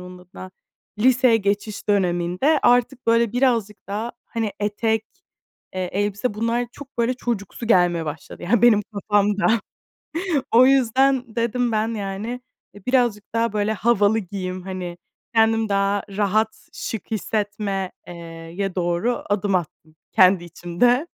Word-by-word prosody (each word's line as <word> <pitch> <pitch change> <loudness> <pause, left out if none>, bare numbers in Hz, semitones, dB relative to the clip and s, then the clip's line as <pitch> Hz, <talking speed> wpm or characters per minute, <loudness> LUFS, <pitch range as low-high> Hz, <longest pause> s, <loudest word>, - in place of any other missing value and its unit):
onun 180 0 -10
adına, 185 +1 -11 0.5
liseye 250 0 +4
geçiş 205 0 -2
döneminde 185 - +2
artık 245 +1 +2
böyle 230 -1 +3
birazcık 235 -5 0
daha, 215 +4 -3
hani, 225 -3 -3
etek, 220 +1 0 0.7
eee, 185 -1 -3
elbise 205 +3 -1
bunlar 230 +3 0
çok 285 -3 -13
böyle 235 +2 +2
çocuksu 235 -2 -4
gelmeye 175 -6 +3
başladı. 155 0 -7
Yani, 210 +5 +2
benim 225 -4 +6
kafamda. 205 0 +1 1.1
O 245 +3 +7
yüzden 260 -1 +3
dedim 235 +1 0
ben, 215 0 +1
yani, 210 +4 -4 0.3
e, 205 - -15
birazcık 240 -6 +1
daha, 230 -1 0
böyle, 210 +1 0
havalı 220 -1 +2
giyeyim, 185 -2 -5
hani, 180 -2 -6 0.4
kendim 225 0 +3
daha 200 0 +1
rahat, 215 +2 -1
şık 225 0 -6
hissetme 205 -3 -2 0.2
eee, 175 - -8 0.4
ye 195 -1 -2
doğru 180 +7 0
adım 205 -1 +1
attım 160 -2 -5 0.2
kendi 185 -1 +5
içimde. 175 - +1
210 Hz, 130 wpm, -22 LUFS, 195-235 Hz, 1.1 s, O